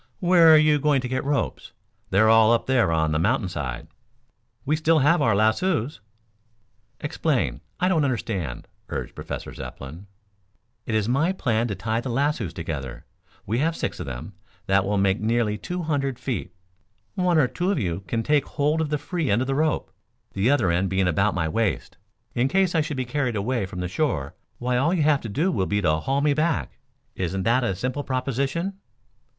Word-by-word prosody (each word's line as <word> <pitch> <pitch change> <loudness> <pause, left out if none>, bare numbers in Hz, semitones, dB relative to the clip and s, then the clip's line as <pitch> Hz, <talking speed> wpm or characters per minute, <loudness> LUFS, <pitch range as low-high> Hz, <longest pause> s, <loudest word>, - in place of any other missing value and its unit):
"Where 175 -3 +6
are 155 - +9
you 155 -1 +4
going 145 -1 +2
to 125 - -4
get 130 +1 -2
ropes? 140 - -2 0.4
They're 105 +3 +4
all 110 0 +6
up 115 - +1
there 125 -9 +2
on 80 -1 +1
the 75 - +1
mountainside." 90 - -1 0.8
"We 150 - +2
still 160 +1 +3
have 155 +4 +4
our 110 -3 +3
lassoes." 115 - +1 1.0
"Explain. 150 -2 -1 0.2
I 180 - +2
don't 165 -5 +2
understand," 100 - -3 0.2
urged - - -4
Professor - - -6
Zepplin. 80 +9 -9 0.8
"It 110 - -1
is 110 -1 +1
my 140 +9 +2
plan 120 -10 0
to 100 - -3
tie 110 +4 -2
the 130 - -5
lassoes 130 - 0
together. 75 -7 -6 0.4
We 115 +5 -1
have 165 +3 +1
six - - -3
of - - -5
them. 65 +10 -7 0.3
That 95 -1 +2
will 100 +1 0
make 95 0 +2
nearly 110 -1 +1
two 180 - -4
hundred 140 -5 -1
feet. 110 -10 -4 0.6
One 180 -4 +2
or 145 -5 +4
two 175 +8 -2
of 200 - +1
you 90 - -1
can 115 +6 -1
take 150 0 +2
hold 150 +2 0
of 155 - -1
the 150 - 0
free 155 +1 -3
end 105 +4 +2
of 130 - -1
the 135 - 0
rope, 155 +2 0 0.4
the 100 +5 +1
other 120 -11 +3
end 90 +3 +1
being 95 0 +1
about 95 +4 +1
my 80 -3 0
waist. 110 +5 -1 0.4
In 120 +2 +1
case 190 +3 +2
I 160 - +3
should 150 -2 -4
be 130 - -1
carried 125 -2 -1
away 110 0 -1
from 90 -1 -6
the 90 - -2
shore, 90 - -1 0.2
why 125 0 0
all 160 +8 +2
you 160 - +1
have 145 -1 +3
to 115 - -6
do 160 - 0
will 95 -5 0
be 105 - 0
to 80 -5 +2
haul 135 - -1
me 145 0 +3
back. 155 +2 -1 0.3
Isn't 95 +1 -2
that 120 +4 +2
a 100 -5 0
simple 130 +8 -3
proposition?" 140 +9 -2
125 Hz, 195 wpm, -24 LUFS, 100-150 Hz, 1.0 s, are